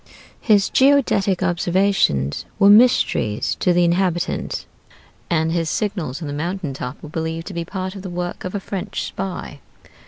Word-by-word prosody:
His 205 -3 +4
geodetic 235 -9 +3
observations 175 - +1
were 200 -1 +6
mysteries 210 - +3
to 180 - +2
the 175 0 +3
inhabitants, 175 0 0 0.6
and 160 -1 +1
his 165 -1 0
signals 175 - -2
on - - -4
the 145 - -4
mountain 165 0 -3
top 130 +1 -7
were 155 - -8
believed 160 +1 -4
to - - -8
be 170 -1 -3
part 185 +1 -4
of 195 - -7
the 190 - -6
work 175 0 -4
of 185 +2 -5
a - - -1
French 195 -1 -4
spy. 190 -6 -5
175 Hz, 160 wpm, -21 LUFS, 160-195 Hz, 0.6 s, were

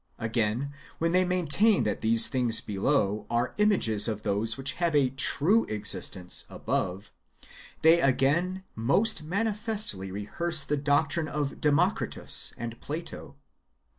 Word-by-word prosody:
Again, 115 +4 -2 0.3
w^hen 165 +1 0
they 185 0 +4
maintain 185 +4 +2
that 105 - -3
these 115 +1 +6
things 125 -4 +1
[below] 105 0 -1
are 120 +2 -1
images 120 - +2
of 105 -2 -4
those 105 +4 -1
which 135 0 -1
have 170 -3 +1
a 135 -3 +2
true 160 - +2
existence 100 -3 -2
[above], 95 +3 -4 0.7
they 165 +2 +6
again 165 +8 +1
most 160 - 0
manifestly 205 - -2
rehearse 140 - +2
the 150 - -1
doctrine 145 +3 0
of 145 -2 -4
Democritus 160 +7 +1
and 115 0 -7
Plato. 160 +4 -7
140 Hz, 125 wpm, -27 LUFS, 110-170 Hz, 0.7 s, these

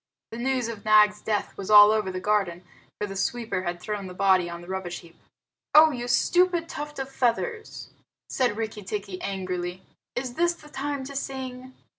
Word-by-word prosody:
The 230 - -6
news 255 -1 0
of 225 -3 -7
Nag's 210 -1 +5
death 210 -2 -2
was 195 - -7
all 210 0 +9
over 215 -3 0
the 185 - -4
garden, 185 -3 0 0.4
for 210 - -1
the 195 -1 -7
sweeper 220 -1 -2
had 175 -1 -4
thrown 205 0 -4
the 180 - -9
body 185 -2 +3
on 170 0 -7
the 175 - -13
rubbish 185 -2 -4
heap. 170 -1 -17 0.6
"Oh, 310 +1 +9
you 245 -3 -4
stupid 350 +6 +2
tuft 295 -1 -6
of 270 -1 -3
feathers!" 350 - -2 0.4
said 245 -5 0
Rikki 220 -1 -4
tikki 195 -1 -5
angrily. 185 -2 -4 0.3
"Is 245 0 -3
this 345 +4 +1
the 300 -3 -16
time 285 -1 -3
to 275 +1 -8
sing?" 260 -1 -6
215 Hz, 185 wpm, -26 LUFS, 190-265 Hz, 0.6 s, all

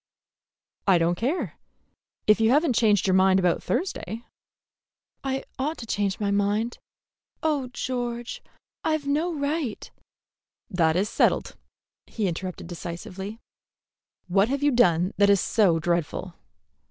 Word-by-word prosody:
"I 190 -2 +6
don't 170 +1 +2
care, 255 - -2 0.7
if 215 +1 +4
you 220 - +4
have 295 +6 +4
n't 270 - +2
changed 215 -4 +3
your 190 - +3
mind 190 0 +5
about 180 -2 +2
Thursday." 240 - -3 1.0
"I 270 0 -2 0.2
ought 300 +5 -1
to 230 - -7
change 200 -3 -1
my 205 -2 0
mind. 205 +4 0 0.6
Oh, 295 -5 +1
George, 240 -1 -4 0.4
I've 310 -2 0
no 305 +5 +1
right 285 -5 -3 0.4
" - - -40
"That 160 -1 +4
is 195 +3 +2
settled," - - +1 0.5
he 215 -4 -2
interrupted 185 +1 -4
decisively. 180 +4 -7 0.9
"What 195 +4 +3
have 280 +1 -1
you 290 - +4
done 185 -7 +3
that 200 0 +5
is 200 -1 +5
so 185 -4 +3
dreadful?" 170 -1 -1
215 Hz, 135 wpm, -26 LUFS, 185-265 Hz, 1.0 s, I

